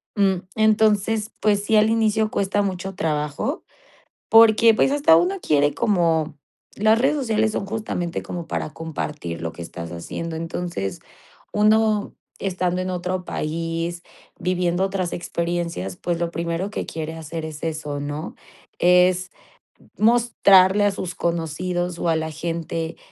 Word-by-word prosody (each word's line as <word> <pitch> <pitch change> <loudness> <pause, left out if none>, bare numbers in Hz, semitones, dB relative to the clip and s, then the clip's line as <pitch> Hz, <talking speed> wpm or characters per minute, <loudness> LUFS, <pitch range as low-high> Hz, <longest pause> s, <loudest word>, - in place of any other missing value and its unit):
Mm, 195 -3 +2
entonces, 215 0 +2
pues, 205 -1 +2
sí, 220 - +2
al 215 +1 +5
inicio 220 -1 +2
cuesta 200 +1 0
mucho 195 -1 -3
trabajo 150 - -2 0.7
porque, 225 0 +7
pues, 265 - +3
hasta 285 - +5
uno 180 +3 +1
quiere 145 -1 +2
como 165 -6 +1 0.4
las 215 +2 +3
redes 275 +5 +2
sociales 220 -5 +1
son 200 - -3
justamente 200 -5 -3
como 175 -2 -6
para 155 - -3
compartir 150 - -5
lo 80 - -3
que - - -12
estás 85 0 -7
haciendo. 160 - -5
Entonces, 165 - -4 0.5
uno 215 0 +2 0.2
estando 185 -1 -1
en 185 0 -2
otro 180 +1 -3
país, 165 +2 -3 0.4
viviendo 180 0 0
otras 190 -2 -2
experiencias, 170 - -3
pues, 170 -1 -2
lo 170 -1 -1
primero 170 +4 -3
que - - -4
quiere 160 0 -5
hacer 160 0 -6
es 155 -2 -7
eso, 155 -3 -3
¿no? 145 +4 -5 0.4
Es 180 +1 +4 0.7
mostrarle 210 -4 +5
a 205 - +4
sus 185 -2 -5
conocidos 170 +1 -2
o 170 - -1
a 165 - +3
la 160 0 -2
gente 165 0 -4
180 Hz, 140 wpm, -22 LUFS, 165-205 Hz, 0.7 s, porque